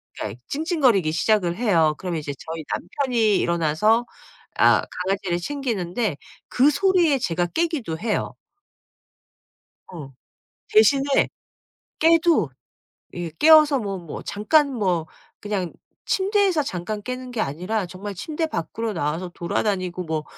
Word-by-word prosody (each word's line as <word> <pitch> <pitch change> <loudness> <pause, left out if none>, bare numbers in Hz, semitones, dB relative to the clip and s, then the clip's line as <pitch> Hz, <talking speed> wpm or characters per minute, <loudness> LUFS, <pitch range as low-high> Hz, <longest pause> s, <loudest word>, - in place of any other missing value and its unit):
그러니까 110 +3 -6
찡찡거리기 275 - +1
시작을 175 +1 +1
해요. 170 -10 +2
그러면 180 -3 -3
이제 145 -1 -5
저희 160 0 -7
남편이 225 0 0
일어나서 170 +8 +2 0.5
아 - - +5 0.2
강아지를 190 -2 -1
챙기는데 215 - -2 0.3
그 265 +4 +4
소리에 340 -2 +3
제가 175 -5 0
깨기도 295 - -2
해요. 220 -1 -2 1.6
어. 150 -6 -9 0.6
대신에 280 -10 +4 0.7
깨도 325 - +4 0.6
이 175 -2 -5
깨어서 305 -3 +7
뭐 200 -4 -4
뭐 170 -4 -8
잠깐 280 +8 +2
뭐 180 -8 0 0.3
그냥 200 -4 -3 0.3
침대에서 390 -4 +2
잠깐 205 -2 -4
깨는 255 +2 -6
게 240 - -3
아니라 180 +5 -2
정말 195 +3 -7
침대 310 - -3
밖으로 225 - -4
나와서 165 +2 -2
돌아다니고 185 0 -2
뭐 155 -1 -3
210 Hz, 275 characters per minute, -23 LUFS, 170-275 Hz, 1.6 s, 깨어서